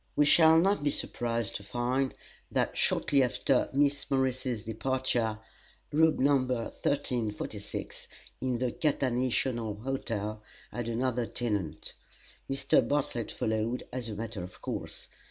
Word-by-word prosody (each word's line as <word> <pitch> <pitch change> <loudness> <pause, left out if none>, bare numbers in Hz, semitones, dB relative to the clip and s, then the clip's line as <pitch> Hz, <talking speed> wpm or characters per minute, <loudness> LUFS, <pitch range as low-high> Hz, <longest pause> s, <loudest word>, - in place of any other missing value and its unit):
We 150 - +5
shall 160 +2 +7
not 195 +3 +3
be 145 - +3
surprised 115 -5 -1
to 100 - -12
find 125 +5 -1 0.3
that - - 0
shortly 140 -1 +3
after 125 +1 +2
Miss 140 +1 +1
Morris's 130 -4 0
departure 115 -1 0 0.5
Room 160 +1 +4
No. 140 +1 +4
1346 125 -2 -2 0.3
in 130 -1 0
the 125 0 0
Catanational 125 -6 0
Hotel 110 -5 -3 0.3
had 120 -1 -4
another 120 0 0
tenant. 105 -9 -3 0.6
Mr. 135 0 +3
Bartlett 135 -5 -1
followed, 110 +2 -1
as 125 -3 -3
a 105 - -4
matter 110 -2 -5
of 90 +1 -9
course. - - -5
125 Hz, 120 wpm, -30 LUFS, 115-135 Hz, 0.6 s, shall